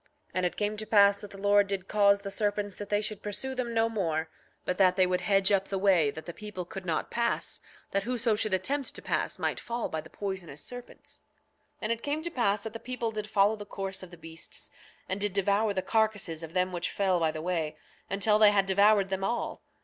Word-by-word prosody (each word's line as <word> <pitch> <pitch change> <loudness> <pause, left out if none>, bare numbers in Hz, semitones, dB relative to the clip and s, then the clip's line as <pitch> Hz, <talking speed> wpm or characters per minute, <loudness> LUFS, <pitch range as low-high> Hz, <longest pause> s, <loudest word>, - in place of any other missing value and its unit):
9:33 - - -30
And 185 -1 +1
it - - -7
came 210 0 -1
to 215 - -3
pass 200 -1 +5
that 205 - -8
the 195 - -11
Lord 205 0 +4
did 195 -1 -3
cause 200 -1 +4
the 200 - -5
serpents 205 -1 -1
that 205 -1 -7
they 205 0 +2
should 215 -1 -2
pursue 235 +6 -3
them 250 -2 -2
no 225 0 +3
more, 165 -8 -1 0.4
but 180 - -1
that 185 -2 +5
they 185 -1 +5
should 180 0 0
hedge 195 +1 +3
up 195 -1 +3
the 195 - -2
way 185 -6 +4
that 155 +2 -7
the 170 - -6
people 205 -3 -6
could 190 +1 -8
not 165 - -1
pass, 235 0 -1 0.3
that 200 - +1
whoso 235 +1 0
should 215 0 -1
attempt 270 +9 -1
to - - -7
pass - - -1
might - - -1
fall 235 0 -3
by 160 - -3
the - - -14
poisonous 190 -7 -5
serpents. 245 0 -10 0.5
9:34 - - -44
And 215 - 0
it 230 0 -1
came 300 +2 -2
to 340 - -3
pass 210 -7 +1
that 220 - -5
the 230 - -6
people 240 -2 -3
did 215 -1 -5
follow 205 0 +4
the 210 - -7
course 195 -2 -4
of 185 - -9
the 175 - -12
beasts, 165 0 -7 0.4
and 190 +2 -3
did 205 -2 0
devour 200 +2 +2
the 190 -2 -1
carcasses 205 -6 0
of 165 0 -8
them 185 0 +1
which 175 -1 -2
fell 190 -3 +1
by 165 -1 +2
the 155 - -4
way, 165 -4 -1 0.3
until 205 +2 +2
they 215 -1 +8
had 200 -1 +3
devoured 200 +1 +4
them 190 0 -2
all. 235 +4 -2
200 Hz, 240 wpm, -29 LUFS, 185-215 Hz, 0.5 s, they